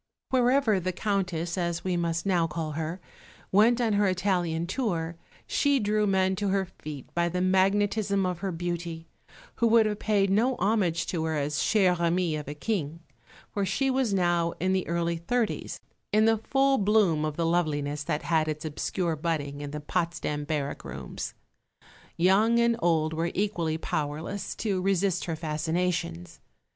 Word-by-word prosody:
Wherever 250 -4 +3
the 185 +1 -2
Countess 180 -3 -1
(as 170 -1 -2
we 185 -1 0
must 170 0 -1
now 175 -4 +2
call 155 0 -4
her) 160 +4 -4 0.5
went 225 +5 +5
on 230 -3 +1
her 205 0 +3
Italian 180 -3 0
tour 175 -6 -2 0.3
she 285 -1 +2
drew 210 -1 +1
men 190 -1 +2
to 205 - -1
her 195 0 +1
feet 145 -3 -8
by 170 0 +1
the 180 +2 -2
magnetism 195 +2 +2
of 180 -2 -2
her 195 0 -2
beauty, 170 -1 -4 0.5
who 235 - +3
would 225 -1 +5
have 210 -1 -1
paid 200 -2 +2
no 240 +6 +3
homage 190 -5 +1
to 165 -3 -2
her 160 -1 -1
as 145 0 -1
chère 185 -3 +3
amie 170 -1 +1
of 150 -2 -5
a 145 - -5
King; 165 -3 -3 0.5
for 200 - -1
she 265 +8 +1
was 260 -4 +1
now 175 -3 +1
in 185 +2 +1
the 190 -1 0
early 170 0 0
thirties, 225 +7 -2 0.3
in 215 +1 +4
the 225 0 +4
full 270 +3 +2
bloom 200 -7 +3
of 155 -1 -2
the 170 - +1
loveliness 150 -4 0
that 150 -1 -2
had 160 -2 +1
its 155 0 -3
obscure 165 +2 -2
budding 145 -3 -3
in 145 - -5
the 150 +1 -5
Potsdam 165 -2 -2
barrack 145 -2 -3
rooms. - - -6 0.8
Young 200 +7 +4
and 235 0 +3
old 160 -3 +1
were 165 +2 -1
equally 175 -6 0
powerless 155 +5 -3
to 200 -4 -1
resist 195 -1 +1
her 165 - -2
fascinations. 155 - -2
175 Hz, 170 wpm, -27 LUFS, 160-205 Hz, 0.8 s, went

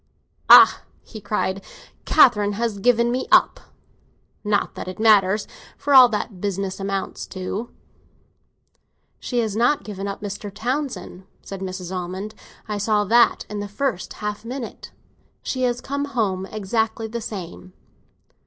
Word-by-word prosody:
Ah!" - - +9 0.2
he 215 - -11
cried, 195 -1 -2 0.4
"Catherine 210 -8 +4
has 220 -1 -2
given 235 +1 +3
me 255 +1 -2
up. - - +5 0.8
Not 210 -1 0
that - - -7
it 185 - -6
matters, 210 -2 +4 0.3
for 285 - -1
all 255 -2 +9
that 210 0 -2
the - - -15
business 195 0 -3
amounts 195 0 -4
to." 195 +5 -5 1.5
"She 245 - -4
has 215 -3 -3
not 245 +6 +2
given 200 -2 -6
up 200 - -5
Mr. 205 0 -6
Townsend," 245 -3 -4 0.2
said 195 -1 -8
Mrs. 185 -1 -5
Almond. 185 +4 -5 0.3
"I 210 -1 -3
saw 210 0 +1
that 235 +4 +3
in 210 0 -5
the 205 - -4
first 205 -1 -3
half 210 0 -5
minute. 245 0 -7 0.5
She 260 - -3
has 245 0 -4
come 280 +1 -3
home 205 -9 -2
exactly 220 +2 -2
the 235 +1 -5
same." 185 -3 -8
210 Hz, 145 wpm, -22 LUFS, 195-235 Hz, 1.5 s, Ah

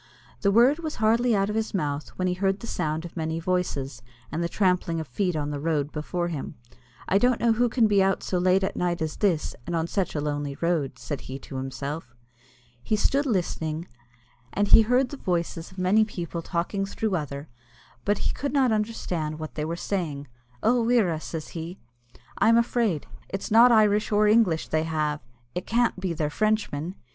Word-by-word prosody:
The 200 - +3
word 245 +8 +5
was 315 -2 -4
hardly 230 +2 +3
out 200 +1 +1
of - - -4
his 220 -1 -1
mouth, 145 -4 -2
when 185 - -1
he 180 - +1
heard 195 +2 0
the - - -8
sound 160 -6 -2
of 170 - -9
many 160 -1 -2
voices, 155 -7 -2 0.3
and 170 - -1
the 170 - -1
trampling 180 -3 +1
of 160 - -5
feet 180 +7 -1
on 150 -1 -2
the 145 - -3
road 150 -1 0
before 175 +3 -2
him. 150 -5 -5 0.5
"I 195 - +3
don't 245 +1 +3
know 235 -1 +3
who 240 +2 +2
can 235 -1 +3
be 205 -2 +4
out 195 0 +1
so 180 - -1
late 185 +2 +3
at 195 - -1
night 175 -1 0
as 155 - -4
this, 180 -7 +1
and 170 - -1
on 165 -1 +1
such 185 0 -2
a - - 0
lonely 145 -1 -2
road," 160 -6 0
said 145 +1 -5
he 130 - -6
to 135 - -7
himself. 135 0 -5 0.7
He 215 - 0
stood 275 +7 +1
listening, 170 -6 -1 0.6
and 205 0 0
he - - +9
heard 250 +3 +2
the 285 - -7
voices 170 -5 -2
of 185 - -17
many 185 +4 +4
people 175 -5 -4
talking 175 +4 -2
through 200 0 -1
other, 145 -2 -4 0.6
but 205 - +1
he - - +1
could 280 -1 -3
not 265 -4 +3
understand 185 -8 -2
what 155 0 -6
they 150 - -3
were 165 +2 -2
saying. 165 -7 -3 0.4
"Oh, 240 +1 +3
wirra!" 215 -10 +2
says 160 -2 -6
he, 170 +2 -6 0.6
"I'm 225 +3 +5
afraid. 230 - +1 0.2
It's 195 +2 -4
not 235 +3 +8
Irish 215 -1 +4
or 210 0 +4
English 210 -7 +3
they 155 - +1
have; 155 -2 -1 0.3
it 180 - -4
can't 235 -3 +2
be 185 -1 -2
they're 155 -2 -1
Frenchmen!" 205 -5 0
180 Hz, 200 wpm, -26 LUFS, 155-215 Hz, 0.7 s, he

